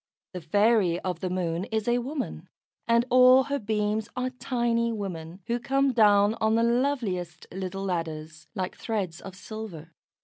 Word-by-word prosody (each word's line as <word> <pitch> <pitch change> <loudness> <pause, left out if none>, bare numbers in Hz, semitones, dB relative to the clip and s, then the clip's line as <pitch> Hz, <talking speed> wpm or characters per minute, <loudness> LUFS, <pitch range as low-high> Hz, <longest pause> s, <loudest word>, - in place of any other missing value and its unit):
The 180 - -5
fairy 200 +1 +3
of 180 -3 -3
the 185 - -2
Moon 180 -1 -2
is 220 -1 -2
a 240 +1 +3
woman, 270 +3 -5 0.4
and 235 0 +3
all 255 +1 +7
her 280 +1 -2
beams 215 0 -1
are 255 0 -2
tiny 235 -2 0
women, 185 -4 -6
who 235 +1 -1
come 275 +1 +1
down 205 -2 +5
on 220 0 +3
the 230 - +3
loveliest 235 - -1
little 190 +1 -5
ladders, 160 -3 -4
like 185 -2 -3
threads 190 -7 -3
of 190 -1 -9
silver. 200 -6 -8
210 Hz, 160 wpm, -27 LUFS, 180-235 Hz, 0.4 s, all